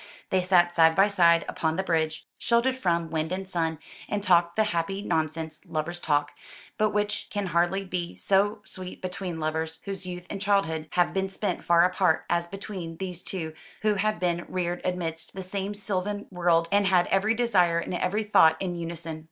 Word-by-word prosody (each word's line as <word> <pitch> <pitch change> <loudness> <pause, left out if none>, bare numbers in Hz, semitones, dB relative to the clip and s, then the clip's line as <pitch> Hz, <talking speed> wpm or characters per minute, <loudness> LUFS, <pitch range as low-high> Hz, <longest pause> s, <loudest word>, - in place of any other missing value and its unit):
They 185 - +3
sat 175 -1 +4
side 160 -1 +5
by 195 +3 +5
side 170 -4 +4
upon 160 -1 -1
the 190 - -1
bridge, 160 -3 -1
sheltered 240 +2 +2
from 170 -8 0
wind 160 0 -1
and 190 +1 -3
sun, 165 -3 -1 0.3
and 205 -1 -1
talked 170 -3 +3
the 220 - +4
happy 195 0 -2
nonsense 160 -2 -2
lovers 170 +3 -3
talk: 145 -1 +1 0.4
but 215 0 +2
which 210 0 -1
can 205 -1 -2
hardly 175 +3 +1
be 175 -2 -4
so 205 +2 +1
sweet 185 -3 -8
between 180 -2 -4
lovers 160 +1 -2
whose 195 -2 -5
youth 180 0 -6
and 195 - -5
childhood 165 -6 +1
have 175 -1 +2
been 190 0 0
spent 200 +2 -3
far 170 0 +5
apart, 180 -2 +2
as 170 0 +1
between 185 -3 -7
these 180 -1 -5
two 165 -4 -5 0.3
who 215 -1 +3
had 210 0 0
been 175 -1 0
reared 175 -1 -2
amidst 165 -2 -3
the 190 - -5
same 195 +2 -3
sylvan 205 0 -3
world, 170 -2 +2
and 200 -1 +3
had 180 -2 +4
every 210 +4 +3
desire 185 -8 +3
and 170 - -3
every 185 +4 0
thought 160 -6 +5
in 185 -2 -2
unison. 165 -1 -5
180 Hz, 185 wpm, -27 LUFS, 165-195 Hz, 0.4 s, side